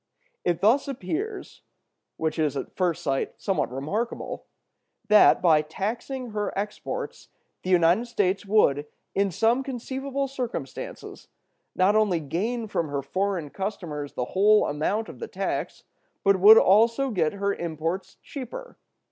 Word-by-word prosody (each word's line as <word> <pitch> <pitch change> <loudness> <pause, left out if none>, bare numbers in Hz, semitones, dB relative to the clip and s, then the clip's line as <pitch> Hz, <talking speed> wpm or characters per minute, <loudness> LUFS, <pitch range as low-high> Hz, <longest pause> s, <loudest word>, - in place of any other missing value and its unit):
It 175 -2 0
thus 250 +8 +4
appears 360 - -5 0.6
(what 160 0 -2
is 150 -3 +1
at - - -6
first 180 -4 0
sight 135 -1 -2
somewhat 195 -10 -1
remarkable) 155 - -4 0.6
that, 210 -3 +6
by 160 -3 +5
taxing 225 - -4
her 210 -1 -2
exports, 210 +1 -5 0.3
the 185 - -5
United 180 +6 +4
States 200 -5 0
would, 170 -9 +2 0.3
in 200 0 +1
some 225 +8 +2
conceivable 270 +1 -3
circumstances, 265 - -6 0.5
not 190 +3 +3
only 210 -6 +3
gain 220 - -2
from 170 -6 -1
her 140 -1 -3
foreign 185 0 -2
customers 170 -8 -5
the 125 - -2
whole 210 +3 +5
amount 190 +10 -1
of - - -11
the 460 - -5
tax, - - -4 0.4
but 195 -1 +4
would 210 +4 +9
also 230 +7 +4
get 165 -7 +1
her 200 0 -1
imports 170 +2 -4
cheaper. 290 - -8
200 Hz, 135 wpm, -26 LUFS, 165-235 Hz, 0.6 s, would